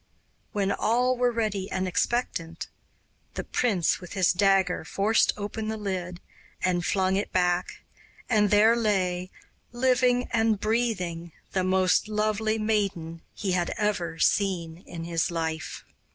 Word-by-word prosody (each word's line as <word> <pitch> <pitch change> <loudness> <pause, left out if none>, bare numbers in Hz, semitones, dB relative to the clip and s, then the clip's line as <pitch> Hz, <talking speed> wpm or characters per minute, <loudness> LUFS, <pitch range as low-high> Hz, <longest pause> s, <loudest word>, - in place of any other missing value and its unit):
When 200 -1 0
all 250 +5 +2
were 245 0 +2
ready 210 -4 -2
and 185 0 -2
expectant, 175 -5 -2 0.7
the - - -3
prince 195 -10 +1
with 180 - -9
his 185 -3 +3
dagger 190 -2 +2
forced 200 +7 +2
open 210 +1 -4
the 220 0 -2
lid 185 -4 -4 0.4
and 180 -1 +1
flung 190 +1 +1
it 200 - -3
back, 180 0 0 0.4
and 210 -3 +3
there 215 +3 +5
lay, 185 -5 0 0.4
living 250 0 +2
and 225 -2 +2
breathing, 185 -7 -1 0.2
the 185 - 0
most 185 +1 +2
lovely 215 +1 0
maiden 200 -7 -1
he 195 -3 -2
had 175 -1 0
ever 180 -6 -1
seen 170 -4 +1
in 165 -1 -7
his 165 -1 0
life. 160 -2 -4
195 Hz, 135 wpm, -26 LUFS, 180-220 Hz, 0.7 s, there